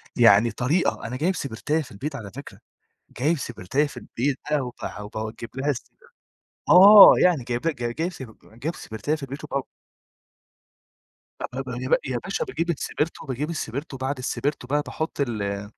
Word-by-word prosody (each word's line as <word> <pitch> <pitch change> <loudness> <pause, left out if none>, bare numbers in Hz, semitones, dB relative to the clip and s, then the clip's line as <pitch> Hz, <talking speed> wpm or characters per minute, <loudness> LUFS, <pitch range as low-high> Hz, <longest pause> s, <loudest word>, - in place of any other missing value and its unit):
يعني 115 -1 +6
طريقة، 130 +2 0
أنا 125 - -5
جايب 180 +6 0
سِبرتاية 145 +5 -2
في 130 -3 -10
البيت 140 +9 -5
على 105 -7 -7
فكرة، 140 - -10 0.6
جايب 155 +5 +2
سِبرتاية 125 +4 -1
في - - -12
البيت 135 +2 -2
بقى 150 - +3
وبه 105 -4 -7
باوجّب 110 +1 -5
لها 135 +2 -1
السبر 130 - -4 0.7
آه 200 +3 +10
يعني 170 -8 +3
جايب 120 +6 -2
ل 160 - 0
ج 120 0 -3
جايب 170 +3 -1
سب 125 -7 -10 0.2
جايب 160 +4 -2
سِبرتاية 130 +8 -3
في 150 - -9
البيت 140 +3 -7
وباو 140 -2 -2 1.9
أبب - - -5
ي - - -4 0.2
يا - - 0
باشا 475 - -2
باجيب 175 - -3
السبرتو 160 0 -2
باجيب 140 +4 -3
السبرتو، 140 -2 -4
وبعد 130 +1 -3
السبرتو 130 +1 -3
بقى 145 +2 +1
باحُط 160 -2 -4
ال 100 -5 -2
135 Hz, 165 wpm, -24 LUFS, 120-155 Hz, 1.9 s, آه